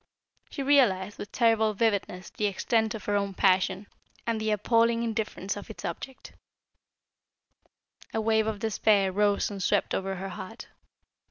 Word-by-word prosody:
She 275 - -4
realised 210 -9 +3
with 205 - -7
terrible 225 -3 +2
vividness 200 -4 -1
the 210 - -1
extent 220 +2 0
of 210 - -8
her 205 - 0
own 200 -1 -1
passion 190 +1 +2 0.4
and 230 -2 -1
the 220 - -1
appalling 230 +2 +2
indifference 220 -4 -3
of 205 - -9
its 220 - -8
objet. 265 -1 -7 1.8
A 225 - -1
wave 220 0 +2
of 220 -1 -2
despair 205 -2 +2
rose 205 +1 +1
and 200 -1 -6
swept 205 +2 +1
over 195 0 -2
her 190 +1 -5
heart. 185 +5 -9
210 Hz, 150 wpm, -28 LUFS, 195-225 Hz, 1.8 s, realised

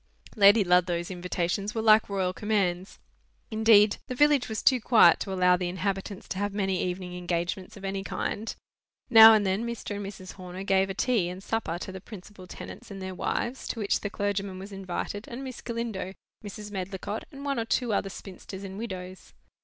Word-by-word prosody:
Lady 205 0 +7
Ludlow's 180 -1 +2
invitations 180 +4 -2
were 225 - 0
like 215 -1 +5
royal 190 -2 -1
commands. 195 -3 -1 0.5
Indeed, 220 -1 +5
the 255 - -4
village 290 -2 +3
was 220 -1 -3
too 255 -3 +4
quiet 230 0 +6
to 195 - -4
allow 180 -1 +4
the 180 -1 -2
inhabitants 195 +1 -3
to 190 - -3
have 205 0 -2
many 190 -3 0
evening 180 0 -3
engagements 175 +2 -3
of 195 - -9
any 195 0 -3
kind. 215 +2 -3 0.6
Now 225 -1 +11
and 210 -2 +2
then, 190 +4 0
Mr. 235 -3 -4
and 205 - -5
Mrs. 190 -2 -9
Horner 185 0 -8
gave 195 0 +2
a 195 - -4
tea 220 -6 +1
and 185 +2 -8
supper 215 -7 -2
to 185 - -6
the 190 -1 -8
principal 195 -2 -12
tenants - - -10
and 200 -1 -8
their 190 0 -5
wives, 240 +7 -3
to 230 - -4
which 205 -2 +1
the 205 - -4
clergyman 200 -1 -2
was 195 +2 -9
invited, 195 +2 -5
and 255 +3 -7
Miss 255 -3 -7
Galindo, 230 -5 -4 0.3
Mrs. 205 0 -8
Medlicott, 195 +2 -5
and 280 -1 -9
one 275 -3 -1
or 225 - -1
two 235 -1 0
other 195 - 0
spinsters 190 0 -9
and 195 +1 -7
widows. 185 -4 -7
195 Hz, 195 wpm, -27 LUFS, 185-220 Hz, 0.6 s, Now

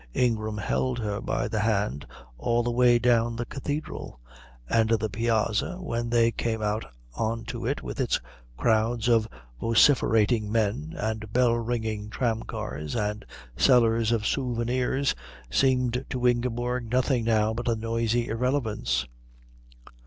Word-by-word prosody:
Ingram 110 -3 0
held 125 +4 -1
her 105 -2 -3
by - - -1
the 110 -1 -2
hand 105 -9 0 0.3
all 120 - +1
the 120 - -1
way 120 0 +5
down 120 -1 +2
the 120 +1 -3
Cathedral, 145 - -5 0.5
and 110 - +2
the 110 -2 +1
piazza 115 - 0
when 120 -9 -3
they 115 -1 +3
came 115 -1 -2
out 105 +1 -1 0.3
on 115 - -2
to - - -4
it - - -2
with - - -6
its - - +1 0.4
crowds 110 - +1
of 115 -2 +3 0.3
vociferating 115 - +3
men 115 +9 -1
and 110 -1 -3
bell 125 -1 +3
ringing 110 -3 -2
tramcars 110 - -3
and 105 -2 -2 0.3
sellers 115 -3 +4
of 115 -2 0
souvenirs 125 +1 0 0.4
seemed 125 - +2
to 125 -1 -2
Ingeborg 120 0 -1
nothing 125 0 +1
now 110 -1 +2
but 120 +2 -4
a 115 - +2
noisy 115 +1 0
irrelevance. 115 - -1
115 Hz, 135 wpm, -26 LUFS, 110-120 Hz, 0.5 s, way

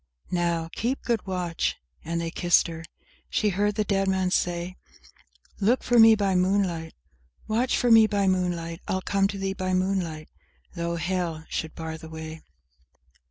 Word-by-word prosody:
"Now, 170 -2 0
keep 250 +5 -2
good 230 -4 -1
watch!" 180 -3 -1 0.3
and 170 +1 -2
they 165 0 -3
kissed 175 0 +3
her. 165 -1 -6 0.5
She 210 - +1
heard 205 +2 0
the 215 - +1
dead 195 -1 0
man 190 -1 +1
say— 175 0 -1 0.8
Look 225 +6 +2
for 245 -1 +3
me 225 0 +9
by 200 -2 +1
moonlight; 180 -3 0 0.5
Watch 240 +4 +1
for 245 - +2
me 225 -1 +8
by 205 -2 0
moonlight; 175 -2 -1
I'll 190 0 -1
come 195 -1 +2
to 200 0 -5
thee 195 0 -2
by 185 -1 -1
moonlight, 185 -5 -1 0.5
though 170 -1 -2
hell 170 -2 -2
should 160 - -4
bar 160 -1 -6
the 160 - -10
way! 160 0 -8
185 Hz, 160 wpm, -26 LUFS, 170-200 Hz, 0.8 s, me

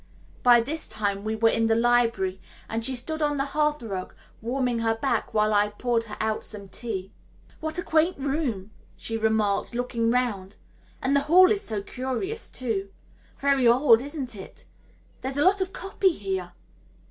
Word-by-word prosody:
By 240 -2 +6
this 305 +7 -4
time 205 -2 -2
we 220 +1 -2
were 225 +1 +3
in 225 0 +1
the 225 - +3
library, 230 -5 +2 0.3
and 225 0 -3
she 265 +2 +4
stood 315 +6 0
on 295 -1 +1
the 275 - 0
hearth 300 -1 0
rug 195 -5 -5 0.3
warming 245 0 -1
her 225 0 +1
back 230 -1 -1
while 215 0 +2
I 205 0 +3
poured 230 +2 -1
her 210 - -8
out 220 0 -1
some 200 -2 -5
tea. 195 -5 -5 0.5
"What 315 +2 -2
a 355 - 0
quaint 325 +3 +2
room," 270 -8 -2 0.3
she 225 - -3
remarked, 220 -1 0
looking 235 -2 -1
round, 220 -6 -1 0.5
"and 270 +2 +2
the - - +5
hall 365 +2 +7
is 410 -2 +1
so 210 -3 -4
curious 265 - -4
too. 215 -6 -3 0.5
Very 275 -3 +3
old, 240 -1 +6
isn't 275 -4 -5
it? 195 - -11 0.6
There's 265 +1 -3
a 290 - +3
lot 390 +1 +4
of 375 0 -1
copy 390 +1 0
here." 190 - -4
235 Hz, 175 wpm, -26 LUFS, 215-280 Hz, 0.6 s, hall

